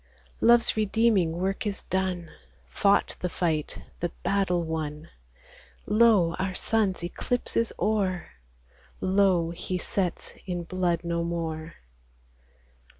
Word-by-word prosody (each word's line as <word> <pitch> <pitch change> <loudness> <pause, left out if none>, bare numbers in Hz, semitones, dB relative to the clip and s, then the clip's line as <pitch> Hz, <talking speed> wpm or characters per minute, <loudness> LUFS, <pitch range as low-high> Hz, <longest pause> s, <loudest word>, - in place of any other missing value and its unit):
Love's 235 0 +5
redeeming 215 -5 +2
work 195 +6 -2
is 200 -2 -3
done, 185 -3 -2 0.4
Fought 200 -1 +2
the 180 - -2
fight, 160 -4 -1 0.2
the 175 - -1
battle 190 -3 +1
won; 155 -1 -4 0.8
Lo! 210 -6 +4
our 185 0 -1
Sun's 200 -6 0
eclipse 245 +8 -3
is 230 0 +1
o'er: 195 -3 0 0.7
Lo! 185 -3 +2
He 180 +2 -3
sets 185 -1 -2
in 175 -2 -2
blood 175 -1 -1
no 170 0 -1
more. 165 -1 -4
185 Hz, 110 wpm, -27 LUFS, 170-200 Hz, 0.8 s, Love's